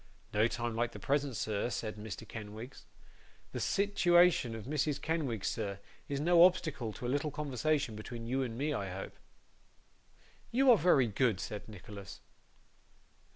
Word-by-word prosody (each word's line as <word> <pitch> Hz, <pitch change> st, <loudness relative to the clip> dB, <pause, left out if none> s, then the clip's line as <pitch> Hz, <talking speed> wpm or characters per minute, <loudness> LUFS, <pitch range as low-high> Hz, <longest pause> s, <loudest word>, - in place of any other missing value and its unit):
'No 105 Hz, +2 st, +4 dB
time 120 Hz, -1 st, -3 dB
like 120 Hz, +1 st, 0 dB
the -, -, -8 dB
present, 140 Hz, -2 st, 0 dB
sir,' 110 Hz, +2 st, -1 dB
said 110 Hz, -3 st, -3 dB
Mr. 105 Hz, -1 st, -7 dB
Kenwigs. 110 Hz, +3 st, -8 dB, 0.7 s
'The -, -, -4 dB
sitiwation 175 Hz, -, +3 dB
of 110 Hz, -, -7 dB
Mrs 145 Hz, +1 st, 0 dB
Kenwigs, 140 Hz, -, -1 dB
sir, 100 Hz, -3 st, -2 dB, 0.3 s
is 140 Hz, -1 st, -1 dB
no 170 Hz, +3 st, +6 dB
obstacle 155 Hz, -10 st, +2 dB
to 125 Hz, -, -7 dB
a -, -, 0 dB
little 145 Hz, +4 st, 0 dB
conversation 145 Hz, -2 st, -1 dB
between 115 Hz, +2 st, -7 dB
you 130 Hz, +3 st, 0 dB
and 120 Hz, -3 st, -3 dB
me, 150 Hz, +3 st, 0 dB
I 100 Hz, -7 st, -3 dB
hope?' 95 Hz, +1 st, -7 dB, 1.3 s
'You 260 Hz, +2 st, +5 dB
are 235 Hz, -, +7 dB
very 150 Hz, -6 st, +5 dB
good,' 110 Hz, -2 st, +1 dB
said 105 Hz, +3 st, -6 dB
Nicholas. 100 Hz, -1 st, -10 dB
125 Hz, 155 wpm, -33 LUFS, 110-150 Hz, 1.3 s, are